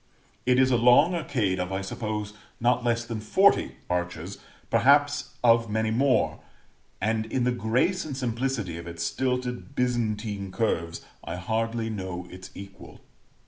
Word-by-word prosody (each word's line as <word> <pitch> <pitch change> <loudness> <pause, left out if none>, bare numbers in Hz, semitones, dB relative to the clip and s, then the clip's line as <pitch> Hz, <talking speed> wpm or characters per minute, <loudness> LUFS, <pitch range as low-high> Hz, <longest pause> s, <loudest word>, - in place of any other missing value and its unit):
It 125 0 +4
is 130 0 +4
a 120 - +4
long 125 +9 +5
arcade 120 - -1
of, 90 +1 -2
I 95 0 -2
suppose, 105 +1 -4 0.3
not 125 +1 +2
less 120 -1 0
than 115 -2 -5
forty 190 - +3
arches, 90 +1 -3 0.3
perhaps 145 +3 +3
of 115 -1 +4
many 110 +1 0
more; 130 +3 +2 0.6
and 110 +2 0
in 125 +2 -1
the 125 - +2
grace 125 +11 +1
and 140 -4 -6
simplicity 120 -8 -2
of 85 - -9
its 85 0 -5
stilted 125 +4 -2
Byzantine 110 -5 -1
curves 85 -7 -2 0.2
I 85 - -5
hardly 115 +4 -2
know 95 -4 -5
its 95 +1 -10
equal. 100 0 -11
115 Hz, 145 wpm, -26 LUFS, 100-125 Hz, 0.6 s, long